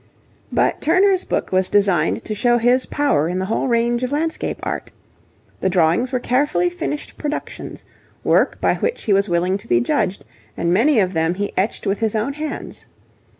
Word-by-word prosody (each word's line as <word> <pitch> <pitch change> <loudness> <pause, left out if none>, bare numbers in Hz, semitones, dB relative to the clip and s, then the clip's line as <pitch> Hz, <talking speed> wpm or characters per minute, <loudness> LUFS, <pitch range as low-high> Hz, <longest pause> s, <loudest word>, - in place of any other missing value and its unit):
But - - +1
Turner's 370 +4 +3
book - - -2
was 185 0 +2
designed 190 -6 +2
to 215 - -3
show 240 +3 +2
his 245 +2 +2
power 280 - +1
in 180 - -2
the 190 - -1
whole 220 +6 -1
range 235 0 +1
of 255 +1 -2
landscape 320 +2 -2
art. - - -4 0.7
The 190 - +1
drawings 180 +8 +2
were 255 - 0
carefully 290 +8 +1
finished 300 -4 -5
productions, 295 -1 -5 0.4
work - - +2
by - - +2
which 485 - -2
he 210 - +2
was 195 +1 +2
willing 180 +3 +1
to - - -13
be 120 - +3
judged, 180 +10 -1 0.3
and 170 +1 +1
many 240 +6 +4
of 190 -2 +1
them 160 +1 0
he 205 +1 -3
etched 200 +4 -1
with 195 +1 0
his 225 -1 0
own 225 +6 -1
hands. 305 +1 -6
220 Hz, 185 wpm, -20 LUFS, 185-280 Hz, 0.7 s, many